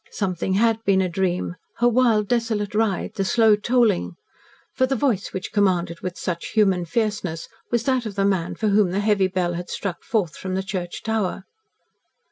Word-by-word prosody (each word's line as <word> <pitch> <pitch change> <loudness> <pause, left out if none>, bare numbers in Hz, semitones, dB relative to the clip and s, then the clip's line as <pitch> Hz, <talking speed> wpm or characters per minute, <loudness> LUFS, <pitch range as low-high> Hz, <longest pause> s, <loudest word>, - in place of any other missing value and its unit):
Something 190 -2 -2
had 225 +1 +2
been 195 -2 +3
a 190 - +2
dream 180 0 -1 0.2
her 240 - +3
wild, 230 -4 +3
desolate 225 -3 -1
ride 210 -3 0
the 195 - -1
slow 220 +2 +4
tolling; 210 - +1 0.6
for 260 - +2
the 270 - 0
voice 235 -7 0
which 190 - -5
commanded 180 -5 +1
with 180 -1 -5
such 170 -2 -3
human 195 -5 +3
fierceness 205 -4 -2 0.2
was 235 -1 0
that 255 -3 0
of 200 - -7
the 195 -1 +1
man 190 -4 0
for 215 - 0
whom 200 -2 +3
the 190 +3 -1
heavy 205 -2 +2
bell 180 -1 -1
had 175 +1 -5
struck 190 -4 -4
forth 200 -9 -1
from 185 -1 -4
the 190 - -1
church 180 -3 -5
tower. 215 -4 -1
200 Hz, 185 wpm, -23 LUFS, 180-220 Hz, 0.6 s, slow